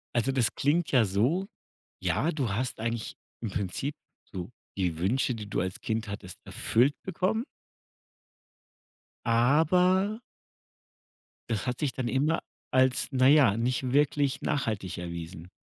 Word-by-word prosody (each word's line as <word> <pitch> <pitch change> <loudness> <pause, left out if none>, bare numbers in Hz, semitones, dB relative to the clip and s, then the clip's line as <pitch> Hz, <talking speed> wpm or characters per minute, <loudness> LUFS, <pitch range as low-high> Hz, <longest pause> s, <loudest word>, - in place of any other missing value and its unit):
Also, 120 +3 +2
das 125 -4 +1
klingt 155 +4 +1
ja 125 -5 +5
so: 125 - +1 0.5
„Ja, 170 - +1
du 135 -7 -1
hast 125 +1 -2
eigentlich 115 0 -3 0.3
im 115 - -3
Prinzip 100 +10 -3 0.4
so 90 0 -5 0.3
die 90 -4 0
Wünsche, 120 +8 +1
die 105 -2 -7
du - - -1
als 95 0 -4
Kind 110 0 -2
hattest, 100 -3 -7
erfüllt 130 +6 +2
bekommen" 190 +5 0 1.8
„aber" 180 - +3 1.3
„das 110 +1 -1
hat 125 -1 -2
sich 140 -4 0
dann 130 -2 -3
immer 145 +7 +1 0.3
als, 130 0 +3
na 130 0 +4
ja, 135 -8 +6
nicht 125 +2 0
wirklich 140 -1 +2
nachhaltig 110 - -2
erwiesen.“ 85 0 -7
125 Hz, 130 wpm, -28 LUFS, 105-145 Hz, 1.8 s, ja